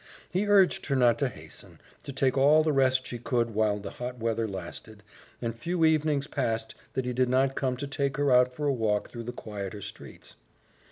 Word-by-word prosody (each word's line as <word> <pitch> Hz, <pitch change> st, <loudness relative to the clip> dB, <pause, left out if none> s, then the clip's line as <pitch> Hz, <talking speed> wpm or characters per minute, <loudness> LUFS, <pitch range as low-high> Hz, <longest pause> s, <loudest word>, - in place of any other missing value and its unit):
He 190 Hz, +4 st, 0 dB
urged 200 Hz, -3 st, +4 dB
her 140 Hz, -, +1 dB
not 120 Hz, -3 st, +4 dB
to 140 Hz, -, +2 dB
hasten -, -, -12 dB, 0.2 s
to -, -, -7 dB
take 130 Hz, -1 st, +1 dB
all 145 Hz, +3 st, +5 dB
the 155 Hz, -1 st, +1 dB
rest 130 Hz, -1 st, +3 dB
she 120 Hz, -, -6 dB
could 120 Hz, -1 st, 0 dB
while 105 Hz, -1 st, +1 dB
the 100 Hz, -, -7 dB
hot 125 Hz, +1 st, -6 dB
weather 115 Hz, -1 st, -1 dB
lasted, 100 Hz, +2 st, -8 dB, 0.4 s
and 115 Hz, -1 st, -2 dB
few 165 Hz, +7 st, 0 dB
evenings 155 Hz, -3 st, +2 dB
passed 115 Hz, -5 st, -2 dB, 0.2 s
that 130 Hz, -, -2 dB
he 125 Hz, -, -2 dB
did 125 Hz, 0 st, +1 dB
not 130 Hz, +1 st, +2 dB
come 130 Hz, -2 st, -1 dB
to 140 Hz, -, -4 dB
take 140 Hz, 0 st, -2 dB
her 145 Hz, -2 st, +2 dB
out 125 Hz, 0 st, +5 dB
for 150 Hz, +4 st, -5 dB
a 140 Hz, -, +2 dB
walk 110 Hz, -4 st, -1 dB
through 115 Hz, -1 st, -7 dB
the 120 Hz, -, -4 dB
quieter 105 Hz, -3 st, -6 dB
streets. -, -, -10 dB
125 Hz, 210 wpm, -28 LUFS, 115-140 Hz, 0.4 s, all